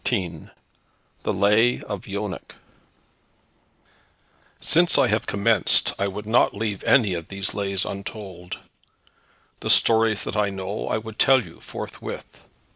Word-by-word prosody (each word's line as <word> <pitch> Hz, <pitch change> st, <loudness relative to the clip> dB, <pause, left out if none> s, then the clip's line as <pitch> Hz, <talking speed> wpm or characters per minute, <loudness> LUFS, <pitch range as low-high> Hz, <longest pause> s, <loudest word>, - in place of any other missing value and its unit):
XIII 90 Hz, -, -2 dB, 0.7 s
THE -, -, -1 dB
LAY 105 Hz, +5 st, +3 dB
OF 100 Hz, -3 st, -6 dB
YONEC 100 Hz, 0 st, -5 dB, 2.0 s
Since 170 Hz, +1 st, +3 dB
I -, -, +5 dB
have 105 Hz, +2 st, 0 dB
commenced 105 Hz, +3 st, +3 dB
I 100 Hz, -, +1 dB
would 105 Hz, +2 st, -6 dB
not 110 Hz, -1 st, +3 dB
leave 105 Hz, -2 st, -3 dB
any 110 Hz, -8 st, +4 dB
of 85 Hz, -2 st, -5 dB
these 100 Hz, 0 st, -2 dB
Lays 100 Hz, -1 st, -1 dB
untold. 95 Hz, -3 st, -7 dB, 1.0 s
The -, -, -4 dB
stories 110 Hz, -3 st, +4 dB
that -, -, -5 dB
I 105 Hz, -1 st, +2 dB
know 95 Hz, +1 st, -4 dB
I -, -, 0 dB
would 110 Hz, 0 st, -8 dB
tell 135 Hz, -2 st, +5 dB
you -, -, -14 dB
forthwith. -, -, -8 dB
100 Hz, 130 wpm, -24 LUFS, 95-110 Hz, 2.0 s, I